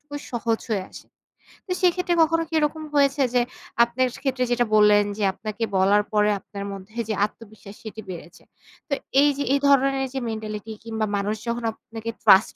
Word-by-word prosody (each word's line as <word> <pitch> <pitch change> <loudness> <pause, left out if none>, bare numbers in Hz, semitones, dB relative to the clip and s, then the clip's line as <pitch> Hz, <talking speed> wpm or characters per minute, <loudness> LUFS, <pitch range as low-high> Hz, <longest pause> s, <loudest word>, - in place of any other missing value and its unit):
টুকুই 290 0 -8
সহজ 230 -1 0
হয়ে 195 -4 0
আসে। - - -12 0.6
তো 370 - -7
সেক্ষেত্রে 360 -1 +2
কখনো 330 +1 +1
কি - - -12
এরকম 310 +1 -1
হয়েছে 280 0 +3
যে, 245 - +4 0.4
আপনার 240 +2 +1 0.2
ক্ষেত্রে 260 -2 0
যেটা 240 0 +2
বললেন 210 -1 +6
যে 210 - -2
আপনাকে 215 +2 -5
বলার 200 +2 +4
পরে 210 0 +4
আপনার 200 +1 -8
মধ্যে 195 +3 -11
যে - - +1
আত্মবিশ্বাস, 210 -1 -12
সেটি 220 0 -7
বেড়েছে? 170 -1 -9 0.5
তো - - 0 0.3
এই 290 - +5
যে 285 - -1
এই 280 - +3
ধরনের 275 -1 +3
যে 270 - -2
mentality 215 0 -5
কিংবা 220 -1 -1
মানুষ 205 +2 -1
যখন 235 0 -2
আপনাকে 225 +1 -7
trust 205 -1 +6
225 Hz, 175 wpm, -24 LUFS, 210-275 Hz, 0.6 s, বললেন